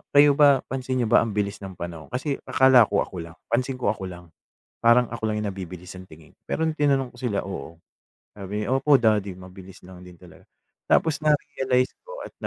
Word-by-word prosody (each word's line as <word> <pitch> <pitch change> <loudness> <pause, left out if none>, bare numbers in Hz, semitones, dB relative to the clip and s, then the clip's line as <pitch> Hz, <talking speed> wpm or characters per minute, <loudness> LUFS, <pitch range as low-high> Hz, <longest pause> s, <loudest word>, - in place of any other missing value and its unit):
kayo 145 0 +7
ba, 140 -2 +4
pansin 130 -1 -3
niyo - - -1
ba - - +7
ang 110 -3 -2
bilis 100 -1 -2
ng 95 -2 -9
panahon?" 85 -2 -7
Kasi 135 +2 -3
akala 130 -4 +6
ko, 100 - +1
ako 90 - -9
lang. 85 0 -9 0.2
Pansin 130 +2 0
ko, 125 -5 0
ako 95 -3 -6
lang. 90 -2 -11 0.5
Parang 120 +1 +5
ako 110 -2 -3
lang 105 0 -2
yung 105 - -2
nabibilis 90 -1 -8
ang 95 - -11
tingin, 80 0 -16 0.2
pero 160 - -1
nung 160 - 0
tinanong 135 -3 +1
ko - - -17
sila, 115 -6 -2
oo, 85 -4 -7 0.6
sabi 105 +1 -4
nila, 130 - 0
"Opo, 140 +1 +4
Daddy, 105 -4 +1
mabilis 95 0 -13
lang 90 -1 -13
din 90 -1 -13
talaga." 90 0 -16 0.5
Tapos 155 -3 +2
na-realize 130 -4 +1
ko - - -9
at - - -12
105 Hz, 205 wpm, -24 LUFS, 95-130 Hz, 0.6 s, kayo